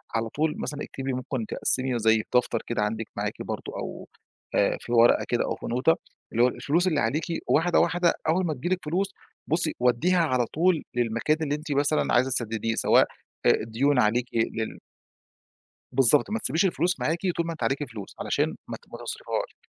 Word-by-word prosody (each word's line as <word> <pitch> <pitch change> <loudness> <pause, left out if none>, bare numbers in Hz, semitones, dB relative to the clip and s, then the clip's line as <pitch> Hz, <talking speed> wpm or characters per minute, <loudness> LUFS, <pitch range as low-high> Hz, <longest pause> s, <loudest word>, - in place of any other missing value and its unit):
على 115 0 0
طول 150 +5 -1
مثلًا 150 0 -4
اكتبي 135 0 -4
ممكن 125 -2 -3
تقسّمي 130 +2 0
زي 110 0 +3
دفتر 120 -2 +2
كده 120 -2 -1
عندِك 110 +1 -1
معاكِ - - -3
برضه - - -5
أو - - -6 0.5
آآ - - +2
في - - -8
ورقة 120 0 +5
كده 120 - +1
أو - - -2
في - - -10
نوته، 125 +7 +2 0.4
اللي 120 +1 +3
هو 125 - +6
ال - - -3
الفلوس 170 +6 +1
اللي 155 -5 +2
عليكِ 130 +8 0 0.2
واحدة، 165 +3 +3
واحدة 175 -1 +3 0.2
أول 180 +3 +2
ما 160 - 0
تيجي 140 +4 -5
لِك 185 0 +1
فلوس، 185 +6 0 0.4
بُصّي 160 0 +2
ودّيها 125 +10 +3
على 130 -5 +1
طول 165 +4 +1
للمكان 120 +6 +1
اللي 145 -2 0
أنتِ 150 +1 -7
مثلًا 145 +2 +1
عايزة 125 +2 +3
تسدّديه، 115 -2 -1
سواء، - - +4 0.4
آآ، - - +7
ديون 125 +5 +1
عليكِ 120 +3 +2
لل 110 -1 -1 1.1
بالضبط، 135 - +5
ما 225 - 0
تسيبيش 160 - +1
الفلوس 180 0 +1
معاكِ 160 +2 0 0.2
طول 170 - 0
ما 165 - -2
أنتِ 160 - -9
عليكِ 140 +2 0
فلوس، 110 -6 -9
علشان - - 0
ما - - -4
ت - - -19
ما - - -7
تصرِفيهاش، - - -4
135 Hz, 190 wpm, -26 LUFS, 120-160 Hz, 1.1 s, آآ